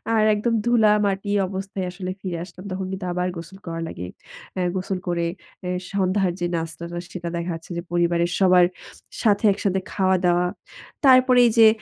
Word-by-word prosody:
আর 215 Hz, -, +4 dB
একদম 230 Hz, +3 st, 0 dB
ধুলা 230 Hz, -3 st, +5 dB
মাটি 200 Hz, 0 st, -1 dB, 0.2 s
অবস্থায় 190 Hz, 0 st, -4 dB
আসলে 185 Hz, 0 st, -5 dB
ফিরে 180 Hz, -3 st, -3 dB
আসলাম। 180 Hz, 0 st, -13 dB
তখন 190 Hz, +1 st, -3 dB
কিন্তু 190 Hz, 0 st, -4 dB
আবার 180 Hz, 0 st, 0 dB
গোসল 170 Hz, +3 st, -9 dB
করা 165 Hz, 0 st, -4 dB
লাগে। 90 Hz, -, -6 dB, 0.5 s
অ্যাঁ 180 Hz, -1 st, 0 dB
গোসল 185 Hz, 0 st, -2 dB
করে 170 Hz, -1 st, 0 dB, 0.4 s
এ্যা 180 Hz, -, -2 dB, 0.2 s
সন্ধ্যার 190 Hz, -1 st, +1 dB
যে, 175 Hz, -, 0 dB
নাস্তাটা 170 Hz, +1 st, -5 dB
সেটা 175 Hz, -2 st, -5 dB
দেখা 170 Hz, +1 st, -3 dB
যাচ্ছে 165 Hz, +2 st, -11 dB
যে, 170 Hz, -, -2 dB
পরিবারের 175 Hz, 0 st, +1 dB
সবার 180 Hz, -2 st, +6 dB, 0.6 s
সাথে 205 Hz, -1 st, +3 dB
একসাথে 195 Hz, -1 st, 0 dB
খাওয়া-দাওয়া। 180 Hz, -2 st, +2 dB, 0.6 s
তারপরে 255 Hz, -1 st, +6 dB
এই -, -, +2 dB
যে, 225 Hz, -1 st, +9 dB
185 Hz, 170 wpm, -23 LUFS, 175-200 Hz, 0.6 s, যে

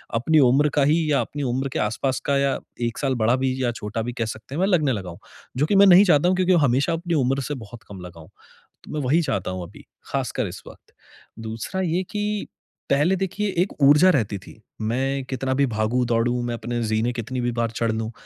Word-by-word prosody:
अपनी 155 Hz, +7 st, +3 dB
उम्र 140 Hz, +4 st, +3 dB
का 140 Hz, -, +5 dB
ही 155 Hz, +1 st, +2 dB
या 140 Hz, -, +3 dB
अपनी 145 Hz, -1 st, -5 dB
उम्र 130 Hz, +2 st, -1 dB
के -, -, -1 dB
आस-पास 120 Hz, +5 st, -1 dB
का 140 Hz, -1 st, +2 dB
या 140 Hz, -1 st, +1 dB, 0.3 s
1 115 Hz, -, -5 dB
साल 135 Hz, -2 st, 0 dB
बड़ा 120 Hz, +3 st, +4 dB
भी 130 Hz, -1 st, +1 dB
या 120 Hz, -, +1 dB
छोटा 110 Hz, 0 st, -5 dB
भी 120 Hz, +2 st, -4 dB
कह 115 Hz, -1 st, -2 dB
सकते 110 Hz, +5 st, -7 dB
हैं, -, -, -3 dB
मैं 190 Hz, -, +3 dB
लगने 155 Hz, -8 st, +2 dB
लगा 95 Hz, -4 st, -5 dB
हूँ। 85 Hz, -, -10 dB, 0.4 s
जो 145 Hz, -, +2 dB
कि 200 Hz, -, +1 dB
मैं 200 Hz, +1 st, +7 dB
नहीं 185 Hz, +2 st, +8 dB
चाहता 165 Hz, -1 st, +4 dB
हूँ। 185 Hz, -, +2 dB
क्योंकि 185 Hz, 0 st, +3 dB
हमेशा 135 Hz, +7 st, +1 dB
अपनी 170 Hz, +1 st, -3 dB
उम्र 135 Hz, 0 st, +1 dB
से -, -, -1 dB
बहुत 120 Hz, +2 st, -13 dB
कम 95 Hz, -2 st, -9 dB
लगा 85 Hz, -2 st, -11 dB
हूँ। 80 Hz, -, -15 dB, 0.5 s
तो -, -, -11 dB
मैं 150 Hz, -, -2 dB
वही 160 Hz, +6 st, +3 dB
चाहता 95 Hz, -8 st, -2 dB
हूँ 95 Hz, -1 st, -5 dB
अभी, 100 Hz, -, -16 dB, 0.3 s
ख़ासकर -, -, -2 dB
इस -, -, -9 dB
वक़्त। -, -, -15 dB, 0.5 s
दूसरा 115 Hz, +11 st, -4 dB
ये 180 Hz, +1 st, 0 dB
कि 210 Hz, 0 st, -2 dB, 0.4 s
पहले 150 Hz, +7 st, +3 dB
देखिए 195 Hz, +2 st, -2 dB
एक 195 Hz, -, -7 dB
ऊर्जा 150 Hz, +6 st, +6 dB
रहती 105 Hz, -, 0 dB
थी। 110 Hz, +3 st, -15 dB, 0.2 s
मैं 135 Hz, +5 st, -1 dB
कितना 130 Hz, 0 st, -2 dB
भी 140 Hz, 0 st, +3 dB
भागूँ-दौडूँ, 120 Hz, +2 st, 0 dB
मैं 120 Hz, -, -2 dB
अपने 120 Hz, +1 st, -4 dB
ज़ीने 110 Hz, +2 st, 0 dB
कितनी 125 Hz, +2 st, -4 dB
भी 120 Hz, 0 st, 0 dB
बार 115 Hz, -1 st, -1 dB
चढ़ 115 Hz, 0 st, -1 dB
लूँ। 110 Hz, +1 st, -3 dB
130 Hz, 230 wpm, -23 LUFS, 115-155 Hz, 0.5 s, नहीं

